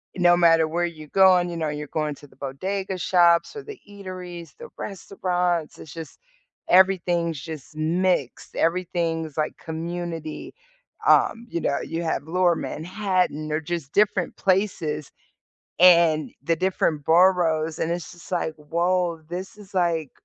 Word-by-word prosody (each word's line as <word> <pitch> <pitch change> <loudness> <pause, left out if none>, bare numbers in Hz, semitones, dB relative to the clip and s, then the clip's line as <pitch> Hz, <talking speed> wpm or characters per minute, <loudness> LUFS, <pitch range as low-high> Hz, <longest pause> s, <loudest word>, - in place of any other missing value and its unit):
no 175 -1 +5
matter 165 -2 +5
where 175 +2 0
you 155 -3 -7
going, 185 0 +5
you 170 - -5
know, 155 -2 -1
you're 150 0 -5
going 155 -1 -2
to 145 - -15
the - - -23
bodega 190 +8 -4
shops 175 - +3
or 430 - -6
the 425 -3 -10
eateries, 185 -4 -9
the 475 0 -10
restaurants, 180 -4 -2
it's 155 - -11
just, 165 -2 -9 0.5
everything's 175 -4 +3
just 155 0 -9
mixed! 165 -3 -1
Everything's 165 -3 -1
like 155 - -1
community, 165 -1 -5 0.5
um, 230 +1 +4
you 170 - -2
know, 140 - 0
you 165 +1 -4
have 160 -3 -1
Lower 175 +1 +2
Manhattan 180 -3 -2
or 155 - +1
just 160 -3 -5
different 200 -2 +1
places 180 -7 0 0.7
and 170 -4 +6
the 165 -1 +1
different 165 -5 0
boroughs, 165 -2 +3
and 165 - 0
it's 175 +1 -4
just 175 -1 -14
like, 165 -2 -1
"Woah, 170 +1 -1
this 185 +3 -6
is 205 -1 -15
like 170 -5 0
170 Hz, 145 wpm, -24 LUFS, 160-185 Hz, 0.7 s, and